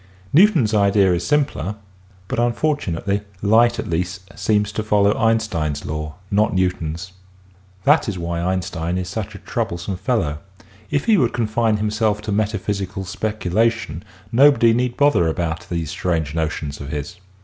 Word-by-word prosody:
Newton's 160 - +5
idea 100 -2 +4
is 85 - -1
simpler, 140 - 0 0.5
but - - -2
unfortunately 120 - 0 0.2
light 115 +3 +4
at - - -4
least 90 +3 -3
seems 105 -1 +1
to 110 - -2
follow 105 -1 +3
Einstein's 105 -10 0
law, 75 0 -4 0.2
not 105 0 +2
Newton's. 90 -1 -1 0.7
That 145 -4 +4
is 100 - -4
why 85 0 -3
Einstein 90 -1 -2
is 90 -1 -3
such 100 +1 -5
a - - -12
troublesome 90 +2 -3
fellow. 95 - -1 0.5
If 145 -1 0
he 220 -2 +5
would 125 -8 +2
confine 110 -1 +1
himself 105 0 0
to 110 - -3
metaphysical 100 -2 -2
speculation 110 -2 -1 0.3
nobody 125 -2 +5
need 125 +1 0
bother 140 - +4
about 85 +1 -2
these 85 -3 -3
strange 80 -5 -1
notions 80 -3 -3
of 70 - -7
his. 75 0 -5
100 Hz, 145 wpm, -21 LUFS, 85-115 Hz, 0.7 s, Newton's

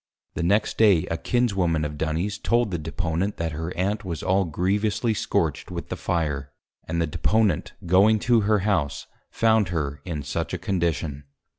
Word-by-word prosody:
The - - -3
next 100 +5 +1
Day 100 -7 +5
a - - +1
Kinswoman 95 -11 +1
of 75 0 -4
Duny's, 80 +7 -2
told 120 -3 +1
the 85 - -2
Deponent, 85 +4 -2
that 85 -1 -2
her 80 +3 -4
Aunt 100 +4 0
was 85 -4 -5
all 95 +1 +2
grievously 100 +7 0
scorch'd - - -1
with - - -6
the - - -2
Fire, 75 -5 -2 0.4
and 85 +1 -1
the 85 - +2
Deponent 100 +3 +1
going 100 +5 +5
to 120 -2 +3
her 105 0 +2
House, 75 -9 0 0.2
found 110 -3 +3
her 75 -4 -3
in 80 -5 -4
such - - -3
a - - -2
Condition. 80 -6 -2
90 Hz, 170 wpm, -25 LUFS, 80-105 Hz, 0.4 s, Day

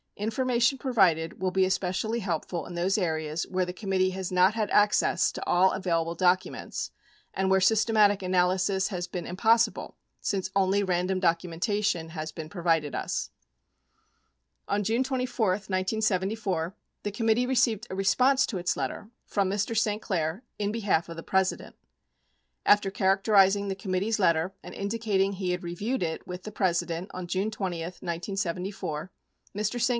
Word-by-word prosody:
Information 240 +4 +1
provided 190 - +2
will 185 -1 +1
be 190 0 +3
especially 190 +4 -1
helpful 170 -3 -3
in 175 - -8
those 185 +4 +1
areas 160 -4 -1
where 185 -1 0
the 180 - -5
committee 185 -1 0
has 185 -1 -4
not 185 +2 +4
had 220 -2 -1
access 205 -3 +3
to - - -6
all 185 +2 +4
available 170 -3 -1
documents, 185 +2 0 0.4
and 190 0 0
where 190 0 +4
systematic 210 0 +4
analysis 185 +2 +1
has 180 -3 -4
been 175 -1 -5
impossible 225 +5 +1 0.2
since 190 -1 -2
only 195 +1 +3
random 185 0 0
documentation 175 +1 0
has 155 -1 -5
been 155 -2 -7
provided 165 -4 0
us. - - -2 1.4
41 - - -1
On - - -1
June 225 +5 +1
24, 255 -4 -1
1974, 190 -2 -1 0.3
tbe 205 - -3
committee 225 +2 +2
received 240 -3 +1
a 190 - -5
response 255 +8 +3
to 195 - -3
its 175 - -1
letter 210 - -4 0.2
from 200 -2 0
Mr. 205 +3 -1
St. 215 -1 +1
Clair 170 +3 -2 0.2
in 205 0 0
behalf 205 -7 0
of 165 - -6
the 165 - -8
President. 190 -1 0 0.9
After 205 -1 +4
characterizing 195 0 +3
the 195 - -2
committee's 195 +3 -1
letter 170 0 +2
and - - -9
indicating 200 -2 0
he 185 -2 -2
had 180 0 -3
reviewed 195 +7 -2
it 160 -1 -3
with 180 0 -7
the 215 - -7
President 175 -2 -1
on 185 -1 -6
June 190 +4 0
20, 190 -6 -3
1974, 180 -1 -4 0.5
Mr. 215 +3 -1
St. 240 - +3
190 Hz, 155 wpm, -27 LUFS, 180-210 Hz, 1.4 s, not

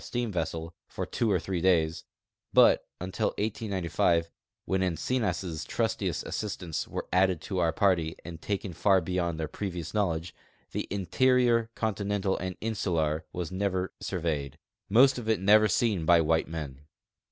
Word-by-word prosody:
steam 120 -2 -2
vessel, 80 -1 -3
for - - -4
two 115 -3 0
or 95 - +3
three 90 0 -3
days; 80 -3 +2 0.5
hut - - +6 0.2
until 90 0 -2
189o 95 -6 0 0.4
(when 95 0 0
Encinas' 90 -2 -1
trustiest - - -1
assistants 90 -6 -4
were - - -5
added 95 -2 +3
to 95 +3 -3
our 85 -2 +3
party 85 -4 +1
and 85 -1 -8
taken 100 -2 -3
far 95 +3 +4
beyond 85 -1 -2
their 80 - -2
})revious 90 -4 -5
knowl 100 -5 +2
edge) 85 +2 -7 0.4
the - - -3
interior, 115 +5 +2
continental 100 -2 -1
and 95 0 -4
insular, 85 -8 -1
was 90 -1 -4
never 95 -1 -1
surveyed, 80 -7 -3 0.3
most 130 +5 +5
of 110 -2 -5
it 110 -4 +2
never 105 +3 +6
seen 105 -2 +1
by 85 +1 +5
white 80 0 +2
men. 75 -4 -6
95 Hz, 150 wpm, -28 LUFS, 85-105 Hz, 0.5 s, hut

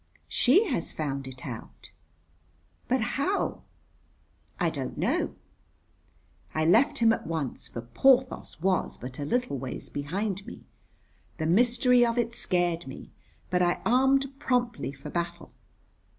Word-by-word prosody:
"She 355 - +4
has 245 - -1
found 140 -3 -3
it 130 -1 -9
out." 120 -5 -9 1.0
"But 255 0 +2 0.2
how?" 385 +8 0 1.0
"I - - +2
don't - - -5
know." - - 0 1.2
I 155 0 +2
left 220 - +4
him 225 -1 +5
at - - -4
once, 160 -6 -3
for 120 - -6
Porthos 255 - +2
was 185 -1 +1
but 125 +2 -8
a 145 - -2
little 245 - 0
way 130 0 -5
behind 190 +7 -2
me. - - -9 0.7
The 160 - -2
mystery 245 +7 +4
of 235 0 +1
it 235 -1 0
scared 175 - 0
me, 130 - -9 0.4
but 180 0 +2
I 175 0 +2
armed 265 +3 +4
promptly 245 - 0
for 135 0 -9
battle. 170 0 -4
185 Hz, 135 wpm, -28 LUFS, 145-245 Hz, 1.2 s, him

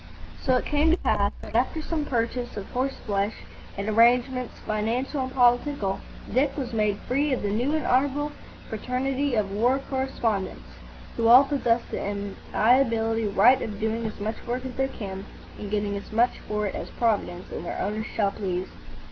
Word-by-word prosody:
So 255 - +2
it 250 - 0
came 300 +2 +2
to 335 - +4
pass 200 - +1
that, - - -9
after 255 +7 +1
some 310 -1 -2
purchase 240 -2 -2
of 195 - -5
horse 265 +2 -1
flesh 200 0 0 0.4
and 200 +1 -3
arrangements 245 +3 +3
financial 235 +7 -1
and 260 0 -3
political, 245 -4 +2 0.3
Dick 270 +5 +2
was 255 -4 -3
made 210 -2 +1
free 280 +3 +1
of 255 - -2
the 205 - 0
New 250 +8 +1
and 310 - -1
Honourable 285 +3 +1 0.4
Fraternity 255 +4 -1
of 205 -3 0
war 240 +6 +2
correspondents, 240 -7 -1 0.5
who 230 -1 +2
all 250 +4 +9
possess 255 -5 +1
the - - -3
inalienable 225 +2 +1
right 245 +7 +6
of 210 -2 -4
doing 220 +1 -1
as 215 - -7
much 215 +2 -3
work 250 +2 -2
as 260 - -5
they 265 +2 0
can 195 -6 -6 0.4
and 205 - -5
getting 205 -1 -1
as 200 - -7
much 235 +3 +2
for 210 0 -1
it 195 - -2
as - - -5
Providence 210 -6 0
and - - -5
their - - -4
owners 215 +3 -2
shall 200 -2 +2
please. 185 -3 -3
230 Hz, 180 wpm, -26 LUFS, 210-260 Hz, 0.5 s, all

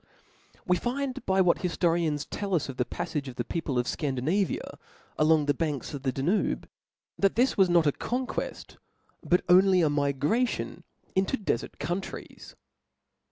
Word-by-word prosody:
We 180 0 +3
find 265 +3 -3
by 190 0 +4
what 180 -2 +3
hifforians 170 -4 0
tells 195 -6 -1
us - - -6
of 130 - -6
the 125 - +1
paffage 140 +2 -4
of 130 - -7
the 120 - -2
people 140 0 -3
of 125 0 +1
Scandinavia, 150 +7 -1 0.4
along 155 -1 +4
the 145 - +2
banks 150 -2 -3
of 140 - -5
the 130 -1 0
Danube, 160 +11 0 0.5
that 195 -1 +3
this 250 +4 +3
was 190 -2 +4
not 170 -2 +4
a 145 - +4
conqueft, 250 - -4 0.4
but 180 - +2
only 185 0 +6
^ 155 -3 +3
migration 145 - 0 0.3
into 190 +8 +1
defert 160 - -2
countries. 180 +3 -5
170 Hz, 155 wpm, -28 LUFS, 145-195 Hz, 0.5 s, only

